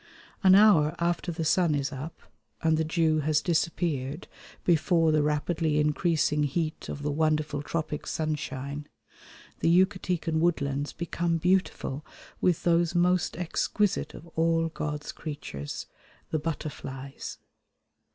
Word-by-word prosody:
An 190 0 +8
hour 175 -7 +6
after 175 +1 0
the 165 -1 -3
sun 155 0 +3
is 140 0 -1
up 145 +4 -7 0.4
and 160 -1 +4
the 160 - +1
dew 160 -1 +2
has 155 0 +2
disappeared 160 -3 -1 0.4
before 165 -1 +3
the 155 -1 +3
rapidly 150 +1 0
increasing 150 0 +2
heat 155 +2 -2
of 145 - -5
the 150 - 0
wonderful 155 -1 0
tropic 155 0 -3
sunshine, 145 -2 -3 0.7
the - - +2
Yucatecan 180 -3 +2
woodlands 145 -4 0
become 170 0 -1
beautiful 175 -5 0 0.4
with 180 -3 +2
those 170 0 +2
most 180 -1 +2
exquisite 185 +3 0
of 155 - -11
all 165 0 +1
God's 150 -2 -4
creatures, 75 - -6 0.5
the 155 - +1
butterflies. 140 -4 -5
160 Hz, 120 wpm, -28 LUFS, 150-170 Hz, 0.7 s, An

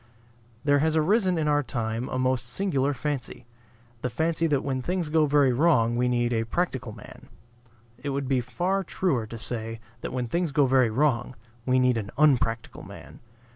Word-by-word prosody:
There 145 -1 +3
has 160 +2 +1
arisen 185 +3 +2
in 155 -2 0
our 145 0 +3
time 115 -2 -3
a - - -3
most 130 -1 0
singular 140 -1 0
fancy: 140 -3 -4 0.6
the 125 - -1
fancy 165 +6 0
that 145 -3 0
when 130 -2 -2
things 175 +2 -2
go 155 -1 +3
very 140 -3 +3
wrong 120 -5 +3
we 125 +1 +1
need 120 -1 +1
a 115 -1 +1
practical 130 -2 -2
man. 105 -1 -13 0.7
It 145 - -4
would 140 -1 -2
be 130 -1 +1
far 180 +10 -1
truer 150 -11 -1
to 115 - -8
say, 115 0 -1 0.2
that - - -5
when 125 -1 -2
things 170 +4 -1
go 145 -1 +3
very 130 -2 +3
wrong 125 0 0 0.3
we 130 0 +3
need 125 -2 +3
an 100 -2 -6
unpractical 125 -6 +1
man. - - -12
130 Hz, 180 wpm, -26 LUFS, 120-155 Hz, 0.7 s, There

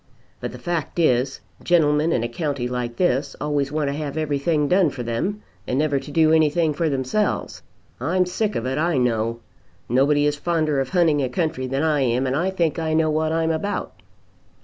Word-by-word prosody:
"But - - -4
the - - -9
fact 175 -3 -3
is, 130 -5 +1 0.2
gentlemen 155 -2 +3
in 120 - +1
a - - 0
county 140 -1 -3
like 125 -1 -3
this 140 -4 0
always 145 -1 -1
want 150 -1 -1
to 140 - -1
have 150 0 -4
everything 150 0 0
done 180 0 +4
for 130 -3 -6
them, 150 - -2 0.2
and 125 - -1
never 145 -1 +1
to 145 - -10
do 155 +1 +3
anything 160 0 +3
for 160 +2 0
themselves. 140 +10 -1 0.4
I'm 180 +8 +1
sick 205 +4 -2
of 115 - -2
it, 130 +3 -1
I 170 -2 +1
know. 115 -2 0 0.5
Nobody 145 +4 +3
is 150 0 +1
fonder 155 -3 0
of 135 - -1
hunting 165 -5 +3
a 130 - -1
country 140 -3 -2
than 135 +3 -1
I 155 -2 +2
am, 125 0 +1
and 130 +1 0
I 175 +6 +1
think 170 -5 0
I 160 -1 0
know 160 -1 +2
what 155 +1 0
I'm 165 0 +1
about." 200 +6 -3
150 Hz, 200 wpm, -22 LUFS, 135-165 Hz, 0.5 s, done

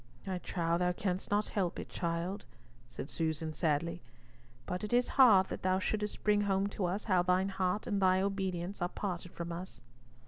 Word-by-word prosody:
"I 190 -2 -2
trow 170 -1 -1
thou 180 0 +2
canst 185 0 -2
not 205 +1 +1
help 185 -4 -1
it, - - -5
child," 170 +4 -3 0.4
said 125 - -7
Susan, 160 -1 -2
sadly; 165 +1 0 0.6
"but 180 +2 -3
it 210 - -3
is 245 0 +3
hard 215 -8 +6
that - - -5
thou 185 0 +2
shouldst 210 +2 -2
bring 210 -1 +4
home 195 -1 +1
to 200 -2 -2
us 190 +4 -1
how 185 -4 +3
thine 185 +2 +2
heart 190 +1 -1
and 205 -3 -1
thine 185 0 +4
obedience 190 -2 -2
are 175 - +1
parted 180 -3 -4
from 170 0 -5
us." 170 -8 -7
185 Hz, 185 wpm, -33 LUFS, 170-200 Hz, 0.6 s, hard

